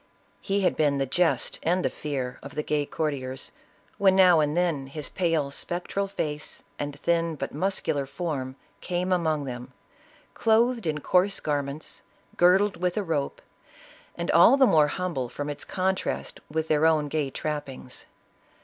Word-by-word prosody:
He 200 +1 0
had 185 - +2
been 145 -2 +2
the 135 - +1
jest 170 +6 +1
and 180 +3 +1
the - - +2
fear 135 -4 -4
of - - -10
the 150 - -1
gay 150 -1 0
courtiers, 135 -4 -3 0.5
when 190 -1 +5
now 180 -3 +6
and 150 +1 +1
then 165 -7 0
his 145 +2 -3
pale 165 -6 0
spectral 180 +6 -2
face, 150 -6 -4 0.2
and 145 -1 -4
thin 170 0 +1
but 135 -1 -5
muscular 150 -4 0
form, 140 -5 -4 0.2
came 180 +1 -2
among 160 -5 +1
them, 125 -1 -7 0.6
clothed 230 -2 +2
in 150 -1 -1
coarse 185 +5 +2
garments, 145 0 -3 0.3
girdled 190 +3 +4
with 180 +1 -1
a 210 - +1
rope, 155 -6 -2 0.7
and 170 0 -2
all 175 +11 +7
the 270 - +6
more 155 -9 +5
hum 180 +3 -3
ble 130 -4 -2
from 145 +3 -4
its 145 - -6
contrast 190 0 -2
with 160 +1 -2
their 155 +1 +3
own 155 -2 +2
gay 145 -1 -1
trappings. 140 -3 -6
155 Hz, 160 wpm, -26 LUFS, 145-180 Hz, 0.7 s, all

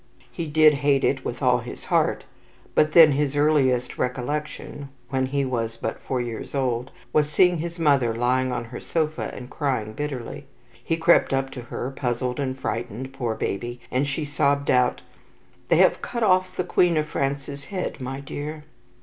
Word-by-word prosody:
He 170 - -4
did 155 0 +6
hate 140 -1 +2
it 130 -2 +1
with 120 +3 -5
all 125 -1 +4
his 120 +1 -9
heart, - - +1 0.5
but 155 0 +3
then 160 -3 +9
his 145 0 0
earliest 135 -4 +2
recollection 140 +2 -3 0.2
when 130 0 0
he 140 +1 0
was 115 -3 -2
but - - -4
four 130 - -2
years 120 +2 -5
old 125 -2 0 0.2
was 150 -1 +3
seeing 180 +2 +4
his 170 +2 -4
mother 140 -7 +3
lying 125 +3 +1
on 125 - -2
her 120 +1 -8
sofa 155 -2 -2
and 125 - -8
crying 130 -7 -2
bitterly. 140 -1 -5 0.4
He 165 - 0
crept 165 -3 +4
up 135 0 -1
to 125 - -7
her, 120 +2 -5
puzzled 125 -1 -2
and 130 -2 -2
frightened, 120 +3 -4
poor 120 -4 -2
baby, 120 +5 -3
and 135 +3 +1
she 145 +2 -2
sobbed 140 -1 +1
out: 125 -1 +2 0.7
"They - - +4
have - - +4
cut 235 -1 -3
off 185 -2 +2
the 180 - +1
Queen 175 -1 +3
of 155 0 0
France's 140 -1 -3
head, 185 -7 -4
my 135 +2 -4
dear." 150 +2 -6
135 Hz, 175 wpm, -24 LUFS, 125-150 Hz, 0.7 s, then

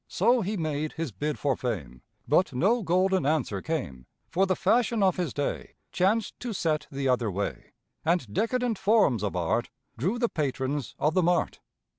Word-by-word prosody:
So 245 0 +3
he 205 +2 -2
made 155 -2 -2
his 165 -5 -4
bid 150 +10 -3
for 140 -3 +1
fame, 75 - -4 0.3
But 150 +4 +3
no 210 - +2
golden 185 0 +2
answer 135 -9 0
came, 70 - -4 0.2
For 190 +3 +2
the 185 - +2
fashion 225 +2 +2
of 185 -2 +3
his 175 -6 -1
day 145 - -3 0.2
Chanced 205 +5 +1
to 245 -2 -4
set 160 -5 -1
the 135 -1 -2
other 125 -3 +2
way, 100 +1 -4 0.3
And 160 - 0
decadent 240 - 0
forms 200 - +3
of 105 -3 -2
Art 90 +7 0 0.3
Drew 185 - 0
the 240 0 +2
patrons 140 - -2
of 150 +2 +1
the 185 - +3
mart. 175 0 +1
160 Hz, 175 wpm, -27 LUFS, 130-190 Hz, 0.3 s, So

